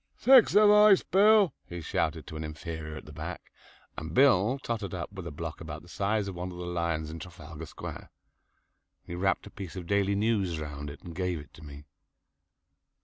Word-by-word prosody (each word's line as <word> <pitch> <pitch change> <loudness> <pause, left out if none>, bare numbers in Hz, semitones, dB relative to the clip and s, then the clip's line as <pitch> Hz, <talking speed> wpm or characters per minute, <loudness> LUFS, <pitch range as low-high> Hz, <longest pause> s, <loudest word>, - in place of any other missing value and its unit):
"Six 260 -3 +6
of 210 0 +7
ice, 210 -2 +7
Bill," 205 +1 +5
he 85 - -6
shouted 80 -1 -2
to 80 - -9
an 80 - -4
inferior 80 0 -6
at - - -9
the - - -11
back, - - -7 0.4
and 80 +1 -6
Bill 130 -2 +5
tottered 105 -6 -3
up 85 +2 -6
with 95 -3 -7
a - - -5
block 80 +4 -6
about 80 -1 -7
the - - -16
size 100 +3 -1
of 95 - -4
one 90 +1 -5
of 90 - -9
the 90 - -5
lions 85 -3 -2
in 80 - -7
Trafalgar 80 -2 -9
Square. - - -8 1.0
He - - -7
wrapped 95 +2 0
a 100 - -11
piece 95 -4 -8
of 90 -2 -6
"Daily 100 +2 +1
News" 100 -6 0
round 75 -1 -6
it 70 - -11
and 85 - -8
gave 90 0 -2
it 75 -1 -11
to 75 - -14
me. 70 -1 -10
90 Hz, 205 wpm, -29 LUFS, 80-100 Hz, 1.0 s, of